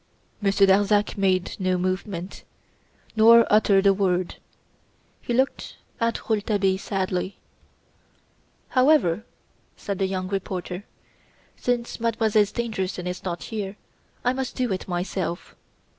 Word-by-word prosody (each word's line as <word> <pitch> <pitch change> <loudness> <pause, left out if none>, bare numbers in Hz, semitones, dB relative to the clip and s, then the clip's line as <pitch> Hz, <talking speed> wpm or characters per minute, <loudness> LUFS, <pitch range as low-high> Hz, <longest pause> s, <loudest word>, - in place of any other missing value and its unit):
Monsieur 200 -1 +4
Darzac 205 +2 +3
made 190 -2 +1
no 185 -1 +1
movement, 185 0 -3 0.7
nor 230 +1 +7
uttered 200 -2 +4
a 200 - +6
word. 185 -2 0 0.8
He - - -5
looked 260 +3 0 0.2
at 230 -1 -1
Rouletabille 205 -3 +1
sadly. 190 -1 -2 1.3
"However," 255 - +3 0.5
said 200 -2 -4
the 195 - +1
young 185 -1 -3
reporter, 185 0 -4 0.7
"since 245 -1 -2
Mademoiselle 220 -2 +2 0.6
is 180 0 -4
not 175 -2 -4
here, 210 -2 -5 0.5
I 250 - +3
must 265 -1 -4
do 250 -5 0
it 185 - -5
myself. 175 -1 -3
195 Hz, 110 wpm, -24 LUFS, 185-220 Hz, 1.3 s, nor